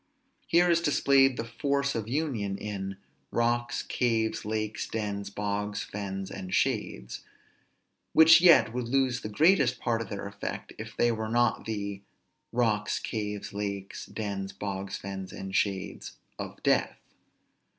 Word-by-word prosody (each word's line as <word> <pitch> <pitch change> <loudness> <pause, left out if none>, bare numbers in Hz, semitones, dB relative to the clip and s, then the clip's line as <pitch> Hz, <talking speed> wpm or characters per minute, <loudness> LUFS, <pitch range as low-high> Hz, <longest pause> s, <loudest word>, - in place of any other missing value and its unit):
Here 175 +1 +5
is 170 -1 +3
displayed 135 -4 +4
the - - -1
force 140 +4 0
of 110 -2 -3
union 120 -9 -1
in 95 -2 -5 0.3
"Rocks, 120 +1 0
caves, 115 -3 0
lakes, 110 0 -2
dens, 100 -2 -3
bogs, 105 0 -2
fens, 95 -1 -5
and 95 -1 -6
shades" 60 -1 -1 0.9
which 165 +1 +8
yet 130 -11 +7
would 125 -1 -2
lose 130 -1 +1
the 105 - -5
greatest 140 - +4
part 115 -1 0
of 110 - -6
their 100 0 -5
effect, 100 0 -6
if - - -8
they 120 - +4
were 110 -1 -3
not 120 +1 +2
the 100 -2 -3 0.5
"Rocks, 110 -3 +1
caves, 105 -2 -4
lakes, 100 -1 -4
dens, 100 -3 -4
bogs, 95 -1 -4
fens, 95 -1 -6
and 95 0 -6
shades 95 -2 -1 0.3
of - - -7
Death." - - +2
110 Hz, 140 wpm, -29 LUFS, 100-120 Hz, 0.9 s, which